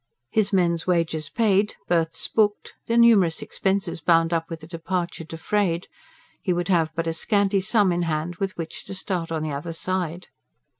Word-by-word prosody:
His 215 -1 +2
men's 175 -3 +1
wages 160 -4 +1
paid, 210 -2 +2
berths 165 -2 0
booked, 210 -2 +1
the 230 - +1
numerous 210 -8 +5
expenses 195 -3 -1
bound 165 +1 +3
up 165 -1 -1
with 165 -1 -7
a - - -9
departure 170 0 -3
defrayed, 170 +2 -1 0.6
he 185 - -1
would 175 +1 -2
have 165 -4 +3
but 165 0 -1
a 165 - -1
scanty 200 +2 +1
sum 205 -1 +3
in 175 0 0
hand 165 +1 -2
with 195 -1 -3
which 165 -1 -6
to 195 - -6
start 180 -3 -3
on 160 -1 -1
the 155 - -2
other 145 +4 -4
side. 180 0 -2
175 Hz, 180 wpm, -24 LUFS, 165-195 Hz, 0.6 s, numerous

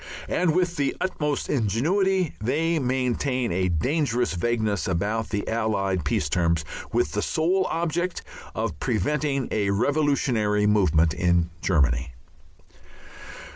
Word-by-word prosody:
And 170 -3 +1
with 175 -1 +1
the 140 -1 0
utmost 150 -6 -1
ingenuity 165 - +1
they 160 +8 +1
maintain 125 -1 0
a 90 +1 +1
dangerous 120 - 0
vagueness 110 +1 -1
about 105 +5 -1
the 100 -1 -3
Allied 100 -5 0
peace 75 - 0
terms, 85 0 +1 0.3
with - - +1
the - - -1
sole 185 +4 +1
object 170 +2 -2 0.3
of 75 - -3
preventing 140 +3 0
a 100 -2 0
revolutionary 115 -3 +1
movement 85 -6 +3
in 85 -1 +1
Germany. 65 -6 +1
115 Hz, 115 wpm, -25 LUFS, 95-150 Hz, 0.3 s, movement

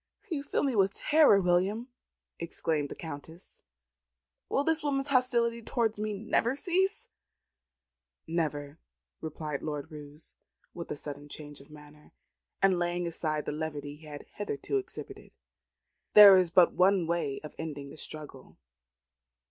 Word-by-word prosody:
"You 300 -4 -1
fill 285 - -1
me 270 -4 0
with 195 -1 +2
terror, 300 -9 +5
William," 190 +6 +1 0.5
exclaimed 160 -3 -2
the - - -7
Countess. 160 +3 -10 0.9
"Will 275 - +1
this 320 +1 +2
woman's 280 -1 -1
hostility 240 -3 +2
towards 225 -1 -1
me 215 0 -2
never 225 +4 0
cease?" 375 +6 0 1.2
"Never," 150 -2 -3 0.4
replied 155 -2 -5
Lord 150 +1 -5
Roos, 150 0 -11 0.4
with 170 - -7
a - - -3
sudden 145 0 -8
change 145 -1 -9
of 140 - -18
manner, 150 0 -16 0.5
and 190 -2 +4
laying 175 0 -1
aside 155 -2 -2
the - - -2
levity 145 -2 -5
he 155 +1 -15
had 145 -1 -9
hitherto 205 - -3
exhibited. 390 - -8 0.8
"There 205 -2 +11
is 185 -2 +3
but 175 +1 +5
one 185 -1 +3
way 165 -5 -1
of 150 - -9
ending 145 -3 -6
the - - -11
struggle. 150 -4 -9
170 Hz, 140 wpm, -29 LUFS, 150-220 Hz, 1.2 s, There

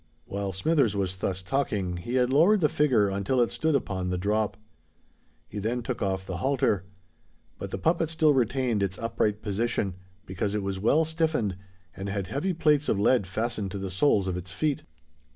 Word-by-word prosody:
While 100 0 -3
Smithers 115 - +2
was 95 -2 -1
thus 95 0 -2
talking, 100 -6 -1
he 120 +9 -4
had 125 0 +2
lowered 180 +8 +5
the 155 - +5
figure 125 -9 +3
until 100 +7 0
it 120 - +3
stood 160 -2 0
upon 95 -8 -1
the 90 - -1
drop. 105 +3 0 0.9
He 105 - -6
then 115 +4 -2
took 125 -1 -4
off 95 -2 -1
the 90 -2 -4
halter; 125 -7 +1 0.7
but - - -5
the - - -4
puppet 165 -1 +1
still 160 -2 +3
retained 125 -3 +1
its 95 -1 -1
upright 110 -2 -1
position, 105 -1 -1 0.3
because 100 +2 -2
it 105 - -1
was 95 -1 -3
well 145 +10 +3
stiffened 160 - 0 0.4
and 95 +1 -5
had 100 -1 -2
heavy 145 - -1
plates 150 -4 +2
of 100 - +1
lead 105 -1 +3
fastened 110 +1 -2
to - - -3
the 95 -1 -4
soles 100 -1 +2
of 90 - -1
its 90 +1 -7
feet. 150 +6 -1
105 Hz, 190 wpm, -27 LUFS, 95-135 Hz, 0.9 s, lowered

